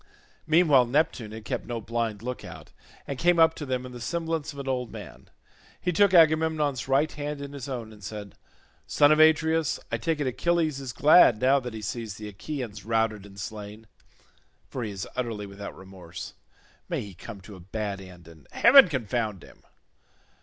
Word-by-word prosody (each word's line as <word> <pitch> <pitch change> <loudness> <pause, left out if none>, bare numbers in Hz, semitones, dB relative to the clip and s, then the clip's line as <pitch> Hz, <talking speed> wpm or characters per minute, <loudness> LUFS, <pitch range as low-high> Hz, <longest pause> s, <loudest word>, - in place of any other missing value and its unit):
Meanwhile 155 -6 +5
Neptune 125 -5 0
had 110 0 -9
kept - - -4
no 120 -1 -3
blind 115 -1 -3
look 125 +1 -5
out, - - -11 0.3
and 140 -2 -5
came 175 +2 +3
up 160 -1 +6
to 150 - -7
them 130 -1 -2
in 125 - -9
the 120 -1 -9
semblance 165 +1 -2
of 140 - -13
an 140 -1 -6
old 125 -2 -2
man. - - -11 0.5
He 180 - -1
took 200 +3 +4
Agamemnon's 155 -6 +3
right 140 +3 +2
hand 145 0 -5
in 140 0 -7
his 140 -1 -7
own 115 -4 -5
and 105 -1 -16
said, 105 -2 -7 0.5
"Son 145 0 +4
of 155 - +4
Atreus, 160 0 +3
I - - 0
take 165 -2 -1
it 145 - -1
Achilles 155 +2 0
is 135 -2 -5
glad 145 -3 +6
now 135 +2 +4
that 125 -3 -7
he 110 - -7
sees 110 0 -4
the 105 0 -8
Achaeans 110 0 -6
routed 110 -2 0
and 100 0 -13
slain, 105 +1 -7 0.8
for 130 - -6
he 110 - -3
is 100 -2 -6
utterly 115 -5 -3
without 100 0 -9
remorse—may 95 -3 -9
he 100 -2 -9
come 100 +4 -10
to 95 +1 -12
a - - -12
bad 100 +2 -4
end 90 -3 -13
and 80 -4 -16
heaven 265 +1 +7
confound 115 - -2
him. - - -17
125 Hz, 190 wpm, -26 LUFS, 105-150 Hz, 0.8 s, heaven